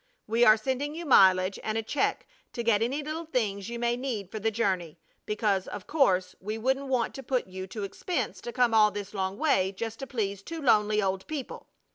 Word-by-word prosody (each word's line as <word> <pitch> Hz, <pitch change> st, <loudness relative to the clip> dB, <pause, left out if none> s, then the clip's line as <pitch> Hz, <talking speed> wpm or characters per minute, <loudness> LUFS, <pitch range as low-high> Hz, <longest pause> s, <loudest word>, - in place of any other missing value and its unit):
We 230 Hz, +2 st, +2 dB
are 215 Hz, -2 st, +7 dB
sending 270 Hz, +6 st, -2 dB
you 340 Hz, +1 st, -6 dB
mileage, 190 Hz, -7 st, +5 dB
and 220 Hz, 0 st, -1 dB
a 225 Hz, -, -1 dB
check 280 Hz, -, -1 dB, 0.3 s
to 235 Hz, -, -3 dB
get 225 Hz, -2 st, +3 dB
any 270 Hz, +6 st, -1 dB
little 315 Hz, +3 st, -4 dB
things 205 Hz, -8 st, -1 dB
you 235 Hz, -, -4 dB
may 235 Hz, 0 st, +1 dB
need 240 Hz, -7 st, -4 dB
for 215 Hz, -, -4 dB
the 225 Hz, +2 st, +1 dB
journey, 190 Hz, -7 st, -1 dB, 0.3 s
because, 205 Hz, -3 st, 0 dB
of 205 Hz, -3 st, -7 dB
course, 190 Hz, -12 st, +2 dB
we 215 Hz, +3 st, -4 dB
wouldn't 265 Hz, +4 st, 0 dB
want 250 Hz, -4 st, 0 dB
to 270 Hz, -, -7 dB
put 255 Hz, -1 st, -1 dB
you 185 Hz, 0 st, -7 dB
to 205 Hz, +2 st, -6 dB
expense 335 Hz, -, -3 dB
to 240 Hz, -, -6 dB
come 245 Hz, -2 st, +2 dB
all 215 Hz, -1 st, +6 dB
this 205 Hz, 0 st, -7 dB
long 190 Hz, -1 st, -2 dB
way 205 Hz, -11 st, +2 dB
just 225 Hz, +3 st, -5 dB
to 270 Hz, -, -6 dB
please 200 Hz, -6 st, -2 dB
two 330 Hz, +10 st, -7 dB
lonely 215 Hz, -6 st, +3 dB
old 190 Hz, 0 st, -2 dB
people. 295 Hz, -5 st, -6 dB
220 Hz, 215 wpm, -28 LUFS, 195-255 Hz, 0.3 s, are